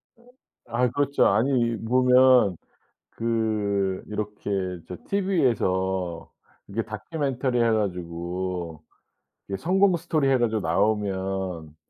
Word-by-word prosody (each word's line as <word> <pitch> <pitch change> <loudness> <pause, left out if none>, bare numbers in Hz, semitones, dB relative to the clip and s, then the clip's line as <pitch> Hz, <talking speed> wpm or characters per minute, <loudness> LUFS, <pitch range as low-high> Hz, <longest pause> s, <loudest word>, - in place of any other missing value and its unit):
어. 235 - -25 0.4
아이 120 +1 +1
그렇죠. 145 +1 +2
아니 115 +2 +2
보면 125 -4 +5 0.6
그 105 -4 -1
이렇게 105 -1 -5 0.4
저 90 - -6
TV에서 95 - 0 0.4
이게 110 +3 -2
다큐멘터리 125 - -2
해 115 -1 +3
가지고 90 -4 -3 0.7
이게 100 - -2
성공 190 - +3
스토리 155 -4 0
해 135 - +4
가지고 110 -2 +1
나오면 95 -3 -1
110 Hz, 220 characters per minute, -25 LUFS, 95-125 Hz, 0.7 s, 보면